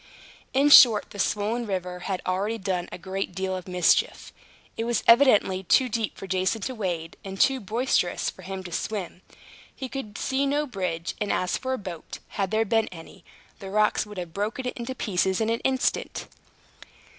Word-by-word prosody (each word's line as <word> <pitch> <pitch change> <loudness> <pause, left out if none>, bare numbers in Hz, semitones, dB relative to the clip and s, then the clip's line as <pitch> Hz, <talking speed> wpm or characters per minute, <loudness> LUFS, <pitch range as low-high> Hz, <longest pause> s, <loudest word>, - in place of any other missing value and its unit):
In 275 +2 +3
short, 230 -7 +8
the 205 - -9
swollen 215 +5 0
river 180 -2 -3
had 190 -2 -2
already 200 +5 -1
done 185 -4 -2
a - - -6
great 190 0 -4
deal 190 0 -2
of 185 -1 -7
mischief. 180 -2 +1 0.4
It 225 - -2
was 235 -2 0
evidently 230 -7 +5
too 250 +7 +3
deep 225 -1 -2
for - - -7
Jason 190 +3 0
to 260 - -3
wade, 175 -7 -4
and 195 0 -7
too 270 -1 +4
boisterous 220 -3 0
for - - -5
him 190 0 -6
to 175 - -8
swim; 190 -1 -4 0.5
he 265 - -5
could 245 -6 -6
see 270 +1 0
no 290 +2 +1
bridge; 180 - -3
and 210 - 0
as 180 - 0
for 260 0 -2
a - - -1
boat, 180 -7 -8
had 195 -2 -2
there 220 +2 +1
been 225 +1 +2
any, 165 -3 -12 0.4
the 195 - -8
rocks 210 +1 +2
would 210 -1 -10
have 175 -2 -6
broken 215 +7 -3
it 250 - -3
to 260 - -4
pieces 190 -4 0
in 225 0 +1
an 230 - 0
instant. 265 0 -1
205 Hz, 190 wpm, -26 LUFS, 185-230 Hz, 0.5 s, short